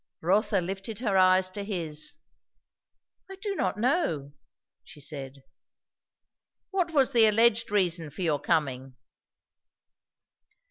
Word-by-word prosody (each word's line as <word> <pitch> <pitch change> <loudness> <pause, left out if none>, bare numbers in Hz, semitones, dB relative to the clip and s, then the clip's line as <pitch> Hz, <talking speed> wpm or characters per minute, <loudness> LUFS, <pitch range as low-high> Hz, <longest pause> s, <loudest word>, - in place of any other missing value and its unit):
Rotha 195 +3 +2
lifted 195 +4 -5
her 215 -4 -1
eyes 185 0 +4
to 200 +2 -5
his. 165 -7 -3 1.1
"I 385 - -8
do 395 +1 -4
not 290 - -1
know," 215 - 0 0.5
she - - -14
said. 140 -2 -7 1.3
"What 370 -3 0
was 275 -4 +3
the 230 -2 +6
alleged 230 +1 +3
reason 175 -6 0
for 145 +6 -6
your 155 -4 +1
coming?" 135 -6 -1
190 Hz, 110 wpm, -27 LUFS, 155-225 Hz, 1.3 s, the